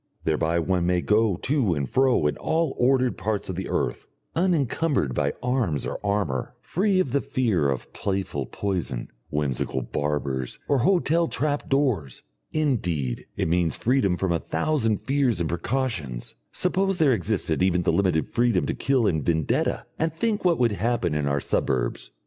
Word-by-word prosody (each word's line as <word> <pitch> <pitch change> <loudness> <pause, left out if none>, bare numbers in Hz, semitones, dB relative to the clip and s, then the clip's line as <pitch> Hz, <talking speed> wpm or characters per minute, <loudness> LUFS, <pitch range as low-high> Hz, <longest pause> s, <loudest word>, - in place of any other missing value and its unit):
Thereby 80 +1 +1
one 85 +1 +1
may 90 -1 +2
go 105 -1 +2
to 115 - +1
and 70 -2 -2
fro 130 - +3
in 75 - +1
all 160 0 0
the - - -6
ordered 130 0 +2
parts 105 -3 -2
of 95 - -3
the 95 +1 -4
earth, - - -2 0.3
unencumbered 160 - +1
by 70 +2 +1
arms 125 - 0
or - - -5
armour, 100 -10 -1
free 195 +1 +1
of 145 -9 +1
the 140 +1 +2
fear 120 - +1
of 65 -3 -4
playful 95 -9 -2
poison, 90 -11 -3 0.2
whimsical 65 -3 -1
barbers, 70 -2 -2
or 140 - +2
hotel 170 +2 +3
trap 145 -2 -1
doors. 125 - 0 0.3
Indeed, 90 - -1
it - - 0
means 85 -2 +1
freedom 110 -8 +1
from 95 -1 0
a 85 - +1
thousand 110 - 0
fears 135 -7 +1
and 85 - 0
precautions. 85 - -2 0.2
Suppose 190 +1 +1
there 150 -6 +4
existed 95 -5 -1
even 90 -1 +2
the - - +2
limited 90 -5 +2
freedom 120 -6 +1
to - - -1
kill 135 -4 +1
in 80 -6 +1
vendetta, 80 -1 0
and 160 +1 +1
think 210 +6 -1
what 175 -3 +3
would 120 -2 +3
happen 105 -5 0
in 75 -1 0
our 70 0 +1
suburbs. 60 -3 -1
100 Hz, 165 wpm, -25 LUFS, -, 0.3 s, there